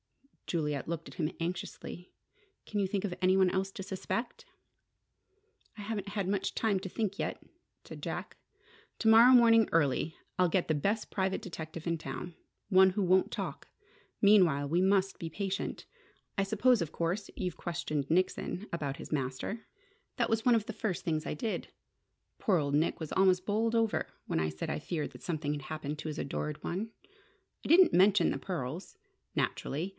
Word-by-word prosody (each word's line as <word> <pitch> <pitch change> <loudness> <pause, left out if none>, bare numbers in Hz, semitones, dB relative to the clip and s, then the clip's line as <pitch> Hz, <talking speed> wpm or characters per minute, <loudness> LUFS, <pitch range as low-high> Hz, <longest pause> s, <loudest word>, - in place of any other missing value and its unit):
Juliet 150 -4 -1
looked 165 0 -4
at - - -10
him 155 -1 -1
anxiously. 180 +1 -5 0.5
"Can 205 -1 -1
you 195 - +1
think 195 0 -1
of 190 - -2
any 185 +1 +4
one 190 -1 +5
else 190 0 -1
to 195 - -7
suspect?" 230 - -4 1.3
"I - - -7
haven't 205 -1 -4
had 200 -2 -2
much 195 0 -1
time 215 -3 +1
to 190 - -5
think 205 -1 -2
yet," - - -3 0.4
said - - -10
Jack. - - -4 0.6
"To 225 - 0
morrow 230 +3 +8
morning 230 -3 +6
early, 160 +1 +1 0.2
I'll 180 -1 +4
get 180 +1 +1
the 155 - +2
best 200 +9 0
private 190 -1 -1
detective 165 -2 -7
in 170 0 +1
town: 155 +4 -6 0.3
one 190 -1 +6
who 195 +2 -1
won't 185 +1 +3
talk. - - -5 0.5
Meanwhile, 180 -9 +5
we 170 +5 +2
must 195 0 +2
be 165 - -4
patient. 195 +4 -3 0.5
I 195 - +3
suppose, 220 +3 +3
of 165 - -2
course, 175 +5 -2
you've 180 -3 -2
questioned 155 -5 -3
Nickson 185 +3 0
about 140 -5 -2
his - - -9
master?" 135 - -3 0.5
"That - - +1
was 225 0 +1
one 245 -2 +5
of 220 -2 +1
the 225 - -5
first 195 -4 -3
things 155 -2 -1
I - - -3
did. 215 +8 -3 0.7
Poor 195 -4 +3
old 140 -3 -1
Nick 155 +3 +1
was 160 -2 -5
almost 185 -1 +3
bowled 225 +3 +1
over 225 -2 +1 0.2
when - - -1
I 80 0 +1
said 80 0 -5
I - - -2
feared 155 0 -3
that - - -13
something 155 -4 -2
had 145 - -4
happened 150 -1 -4
to 155 - -4
his 155 - -5
adored 150 +2 -3
one. 205 +6 -3 0.7
I - - -6
didn't 355 +3 +7
mention 190 0 +5
the - - -2
pearls 165 -1 -5 0.4
naturally! 160 +7 -1
185 Hz, 180 wpm, -31 LUFS, 160-205 Hz, 1.3 s, morrow